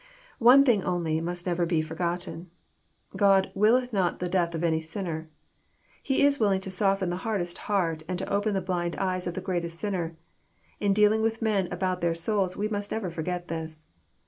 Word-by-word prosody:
One 255 +3 +7
thing 220 -7 +3
only 165 -3 -1
must 175 +1 -4
never 175 -1 0
be 165 -2 +1
forgotten. 170 +1 -3 0.7
God 195 -2 +4
" - - -28
willeth 245 +2 +4
not 185 -4 +1
the 180 - -3
death 175 -2 0
of 165 - -3
any 160 -1 +1
sinner." 160 -1 -5 0.7
He 270 +1 +2
is 285 0 +3
willing 200 -4 +3
to 190 - -6
soften 195 -1 +1
the 175 - -2
hardest 185 -4 -2
heart, 170 -6 +1
and 180 0 -2
to 190 - -3
open 205 +1 0
the 190 - 0
blind 175 -2 -2
eyes 185 -1 -1
of 175 - -4
the 185 - -3
greatest 170 -2 -2
sinner. 175 -5 -3 0.6
In 205 -1 +2
dealing 210 +2 +4
with 225 0 -1
men 200 -5 +1
about 180 0 -1
their 170 -1 +1
souls 190 +1 -1
we 210 - 0
must 205 -1 -3
never 200 -6 -2
forget 175 +2 -4
this. 160 -1 -6
185 Hz, 195 wpm, -27 LUFS, 170-205 Hz, 0.7 s, One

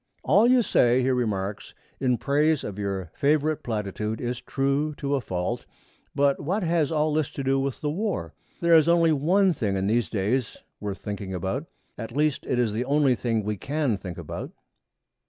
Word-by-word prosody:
'All 230 +4 +5
you 250 -1 +5
say,' 125 - +3
he 130 - +2
remarks, 105 -5 -2 0.2
'in 125 -2 +2
praise 150 +2 +1
of 105 -1 -6
your 95 -4 -3
favorite 150 +1 +1
platitude 105 -1 -3
is 120 0 -3
true 140 +2 -1
to 140 0 -2
a 140 - +1
fault. 90 -5 -3 0.5
But 140 -1 +2
what 185 +8 -1
has 165 -3 +1
all 155 -1 +1
this 155 -2 +1
to 140 - -4
do 135 0 +2
with 135 -1 -3
the 150 - -1
War? 200 +4 -2 0.3
There 170 0 +4
is 160 0 +6
only 170 -1 +4
one 180 +6 +3
thing 105 -9 -1
in 95 0 -1
these 115 +3 +1
days 115 +4 -1 0.2
worth 100 -2 -4
thinking 100 -2 -5
about 95 - -3 0.3
at 115 +3 -6
least, 150 -2 +1
it 125 - 0
is 120 -4 +1
the 120 +4 -1
only 140 -1 +3
thing 115 -2 -1
we 105 0 -2
can 140 - -1
think 90 -3 -7
about.' 85 -4 -6
130 Hz, 190 wpm, -26 LUFS, 105-150 Hz, 0.5 s, is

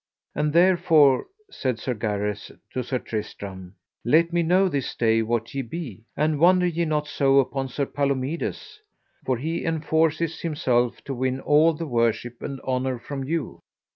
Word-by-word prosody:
And 150 0 0
therefore, 165 -5 +4 0.2
said 130 -4 -2
Sir 125 +3 -3
Gareth 105 -2 -3 0.2
to 130 - -2
Sir 130 +2 -2
Tristram, 100 -5 -6 0.3
let 165 +8 +3
me 175 - +3
know 180 +4 +3
this 140 -7 -2
day 115 -1 +2
what 115 +2 -2
ye 135 - -1
be; 120 - -7
and 155 -1 +1
wonder 180 +2 +5
ye 170 -1 0
not 150 -1 -1
so 140 -1 +2
upon 135 0 +1
Sir 140 +2 -2
Palomides, 140 - -3 0.5
for 130 -2 +1
he 160 +7 -3
enforceth 160 0 0
himself 125 -7 0
to 140 - -5
win 130 +1 -1
all 150 +4 +4
the 165 +2 -5
worship 120 -2 -1
and 135 -1 -5
honour 130 0 -1
from 135 +3 -6
you. 160 +2 -3
140 Hz, 160 wpm, -24 LUFS, 120-160 Hz, 0.5 s, wonder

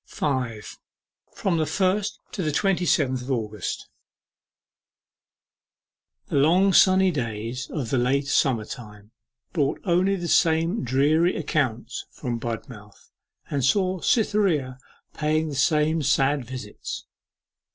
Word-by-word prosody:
5. 125 -7 -3 0.6
FROM 185 -4 0
THE 155 - 0
FIRST 195 +5 0
TO 195 - -4
THE 155 -3 0
TWENTY 185 +2 +1
SEVENTH 130 -6 +2
OF 125 - -9
AUGUST 105 -5 -3 2.4
The - - -2
long 180 +7 +4
sunny 190 0 +5
days 120 -1 -4
of 130 -8 -4
the 130 - +2
later 135 +3 +1
summer 120 -7 +2
time 105 -3 -10 0.4
brought 145 -5 0
only 185 +1 +2
the 175 -2 -4
same 165 +3 +2
dreary 150 +7 +2
accounts 125 -6 -2
from 120 -4 -4
Budmouth, 115 -2 -8 0.4
and 140 -2 -1
saw 185 +6 +2
Cytherea 180 - +1 0.3
paying 155 +1 0
the - - -5
same 155 +4 +2
sad 140 -1 +2
visits. 125 -4 -7
145 Hz, 120 wpm, -24 LUFS, 125-170 Hz, 2.4 s, sunny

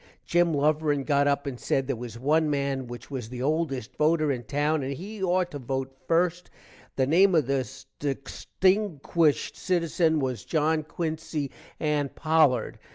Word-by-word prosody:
Gim 175 -2 +2
Luverin 150 0 +1
got 140 -1 +3
up 140 0 +1
and 130 -3 -5
said 135 - 0
there 135 - -1
was 120 -1 -7
one 150 +5 +2
man 140 -2 -1
which 120 +3 -9
was 125 -5 -5
the 125 0 -5
oldest 145 -5 -1
voter 155 -1 +3
in 125 -3 -2
town 145 +4 0
and 135 +1 -3
he 200 +8 -8
ought 180 -1 +1
to 145 - -6
vote 130 +1 -3
the 135 - -35
first, 175 +1 +1 0.5
the 130 - +2
name 180 +6 +4
of 155 -5 +3
this 130 -3 -3
destinkuished 160 +3 0
sitizen 165 -3 +1
was 130 -5 -2
John 155 0 +1
Quincy 155 -2 -4 0.3
Ann 150 -2 0
Pollard. 155 -7 +2
150 Hz, 160 wpm, -27 LUFS, 135-160 Hz, 0.5 s, name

